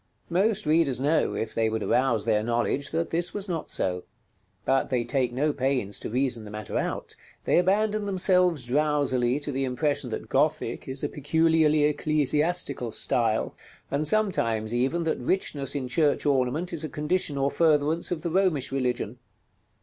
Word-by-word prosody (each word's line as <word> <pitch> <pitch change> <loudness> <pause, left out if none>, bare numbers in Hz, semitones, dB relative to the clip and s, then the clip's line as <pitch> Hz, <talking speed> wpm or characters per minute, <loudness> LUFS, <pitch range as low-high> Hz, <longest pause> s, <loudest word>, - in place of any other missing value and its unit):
Most 200 +3 +1
readers 150 -4 +2
know, 150 +4 +1
if 110 - -3
they 110 -1 +1
would 110 0 -2
arouse 125 -5 +1
their 105 - +2
knowledge, 120 +5 -1
that 165 +1 -2
this 175 +1 -1
was 205 -1 -2
not 170 -4 -4
so; 90 -1 -2 0.6
but 135 0 +1
they 125 -2 0
take 125 0 0
no 145 +5 0
pains 130 -7 -1
to - - -5
reason 125 -1 -1
the 105 - -9
matter 105 0 -7
out: - - -2 0.3
they - - +3
abandon 210 +3 +1
themselves 180 -6 +2
drowsily 140 -2 +1
to 145 0 -5
the 135 0 -1
impression 135 0 -1
that 110 - -5
Gothic 145 -3 0
is 135 +2 -5
a - - +1
peculiarly 155 +1 +2
ecclesiastical 150 -3 0
style; 110 -1 0 0.4
and 150 +2 0
sometimes, 115 - +1
even, 135 +8 0
that 160 - -1
richness 140 -2 -1
in 135 -3 -2
church 150 +3 +1
ornament 145 +5 0
is 165 -2 -1
a 155 - -4
condition 150 -1 -1
or 140 0 +1
furtherance 155 0 +2
of 170 -3 -3
the 170 - -2
Romish 180 -8 +1
religion. 125 -3 -2
145 Hz, 165 wpm, -26 LUFS, 125-165 Hz, 0.6 s, they